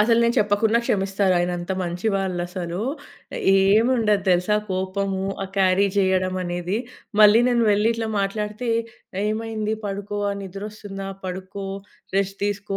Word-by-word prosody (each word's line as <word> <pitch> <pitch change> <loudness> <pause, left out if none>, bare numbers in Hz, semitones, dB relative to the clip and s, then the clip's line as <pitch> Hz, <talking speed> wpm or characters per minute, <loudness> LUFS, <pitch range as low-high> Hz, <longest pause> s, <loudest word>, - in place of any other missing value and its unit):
అసలు 230 +2 +4
నేను 235 0 +2
చెప్పకున్నా 210 +2 +3
క్షమిస్తారు. 195 -1 +1
ఆయనంత 175 0 -2
మంచి 180 +3 -3
వాళ్ళసలు. 180 -2 -2 0.7
ఏముండదు 210 +2 +3
తెలుసా? 180 +4 +3
కోపము 190 +1 -2 0.2
ఆ - - -1
క్యారీ 190 +1 +4
చేయడమనేది. 185 -1 0 0.4
మళ్ళీ 210 +2 +8
నేను 240 -1 +2
వెళ్లి 210 +2 +3
ఇట్లా 230 -1 -3
మాట్లాడితే, 210 +4 -2 0.6
"ఏమైంది? 215 0 -2
పడుకో, 205 +1 -4
ఆ! - - -1
నిద్రొస్తుందా? 195 0 -7 0.2
పడుకో, 190 +2 -5 0.5
రెస్ట్ 195 0 0
తీసుకో, 205 -1 -2
195 Hz, 120 wpm, -23 LUFS, 185-210 Hz, 0.7 s, మళ్ళీ